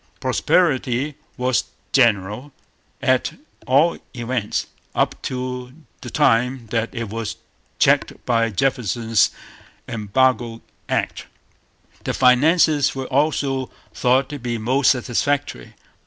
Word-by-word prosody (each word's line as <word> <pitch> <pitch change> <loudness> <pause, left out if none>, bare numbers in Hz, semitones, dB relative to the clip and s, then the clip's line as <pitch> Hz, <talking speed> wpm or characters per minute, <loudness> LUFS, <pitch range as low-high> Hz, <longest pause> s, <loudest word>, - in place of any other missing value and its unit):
Prosperity 140 -4 +1 0.2
was 125 -1 +1 0.3
general; 115 +1 +2 0.5
at 130 -1 +2 0.3
all 145 +6 +3 0.2
events, 120 -2 -2 0.3
up - - 0
to 125 -1 -4 0.3
the - - -7
time 125 +2 +2
that 115 -1 0
it 115 -4 -5
was 115 0 -4 0.4
checked - - +3
by 115 -1 +2
Jefferson's 115 -3 +1 0.6
Embargo 115 +1 0 0.3
Act. - - -2 0.8
The - - -2
finances 145 +3 +4
were 135 -1 -3
also 135 -1 0 0.2
thought 130 +2 +2
to 145 -1 -6
be 120 -1 -3
most 130 +5 +2
satisfactory. 130 - -1
125 Hz, 100 wpm, -21 LUFS, 115-135 Hz, 0.8 s, finances